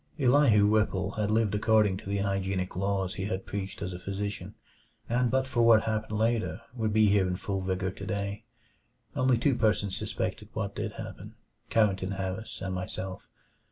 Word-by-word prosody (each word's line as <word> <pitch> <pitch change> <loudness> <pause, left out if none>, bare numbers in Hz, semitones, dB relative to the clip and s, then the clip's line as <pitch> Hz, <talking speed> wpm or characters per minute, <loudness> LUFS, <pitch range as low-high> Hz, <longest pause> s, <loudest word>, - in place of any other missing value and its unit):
Elihu 125 -6 +5
Whipple 105 -3 +2
had 105 -1 -1
lived 110 -1 +2
according 105 -2 +3
to 100 - -9
the 100 - 0
hygienic 95 -2 -1
laws 95 0 0
he 95 - -4
had 95 -2 -3
preached 100 0 -5
as 90 -1 -3
a 90 - -6
physician, 100 +2 -4 0.5
and 120 +1 +2
but 130 +1 +2
for 120 -2 0
what 115 -2 +6
happened 110 -1 -2
later 115 +1 +1
would 110 -3 -1
be 110 +1 +5
here 100 -2 +3
in 90 - -1
full 95 +1 -3
vigor 95 0 -1
today. 100 +2 -4 0.7
Only 130 -1 +3
two 135 +4 +2
persons 105 -4 +1
suspected - - -3
what - - -3
did - - -4
happen - - -8 0.3
Carrington 100 -3 +2
Harris 95 +3 -4
and 95 -1 -3
myself. 95 0 -5
100 Hz, 170 wpm, -29 LUFS, 95-110 Hz, 0.7 s, what